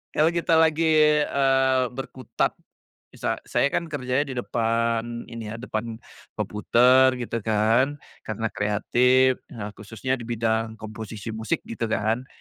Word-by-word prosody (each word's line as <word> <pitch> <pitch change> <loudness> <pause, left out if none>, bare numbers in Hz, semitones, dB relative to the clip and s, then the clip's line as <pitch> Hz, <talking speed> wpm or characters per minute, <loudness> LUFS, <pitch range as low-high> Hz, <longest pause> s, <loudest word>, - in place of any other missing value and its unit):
kalau 160 +2 +4
kita 170 -1 +1
lagi, 160 0 +3 0.4
eee, 135 -1 +2
berkutat. 130 -2 -3 0.5
Misa - - -3
saya 140 - +1
kan 170 - -1
kerjanya 135 -2 -1
di 130 - -5
depan 115 0 -1
ini 115 -2 -6
ya, - - -5
depan 115 -1 -4 0.4
komputer 125 +5 +4
gitu 120 -2 -3
kan, 110 +6 +2 0.3
karena 110 +1 -2
kreatif, 125 +5 +2
nah 105 -2 -7
khususnya 115 +5 -3
di 115 - -8
bidang 115 -1 -1
komposisi 110 0 -7
musik 110 -1 -3
gitu 115 0 -4
kan. 110 +4 -1
115 Hz, 130 wpm, -24 LUFS, 110-130 Hz, 0.5 s, kalau